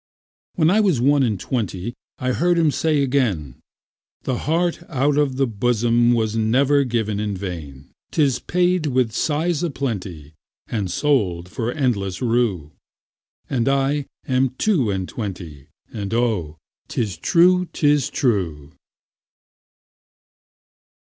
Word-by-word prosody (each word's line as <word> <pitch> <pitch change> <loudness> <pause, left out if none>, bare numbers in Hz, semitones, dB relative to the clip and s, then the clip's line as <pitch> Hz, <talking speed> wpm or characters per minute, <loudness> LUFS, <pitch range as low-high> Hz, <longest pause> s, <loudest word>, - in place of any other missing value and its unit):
When 160 0 +3
I 210 - +4
was 190 - +2
one 140 +3 +3
and 110 -7 0
twentyI 110 -2 -3 0.4
heard 175 +4 +2
him 160 -3 +3
say 150 -1 +1
again,'The 125 - -4
heart 170 +1 +1
out 140 -1 +1
of 145 -3 +1
the 135 +1 +2
bosomWas 120 0 +2
never 130 +6 +3
given 110 -5 -1
in 105 -2 -2
vain;'Tis 90 - -3
paid 180 -2 +1
with 130 -4 +1
sighs 155 +6 0
a 175 - 0
plentyAnd 95 - -5
sold 90 - 0
for 115 +4 -3
endless 100 -10 -1
rue.'And 115 - -3
I 140 +1 +1 0.2
am 130 0 +1
two 165 - +2
and 95 -2 -2
twenty, 90 - -7 0.3
And 105 0 -3
oh, 105 -11 0 0.3
'tis 105 -6 -2
true, 180 - +4
'tis 145 -2 +2
true. 85 - -1
120 Hz, 110 wpm, -21 LUFS, 100-145 Hz, 0.4 s, I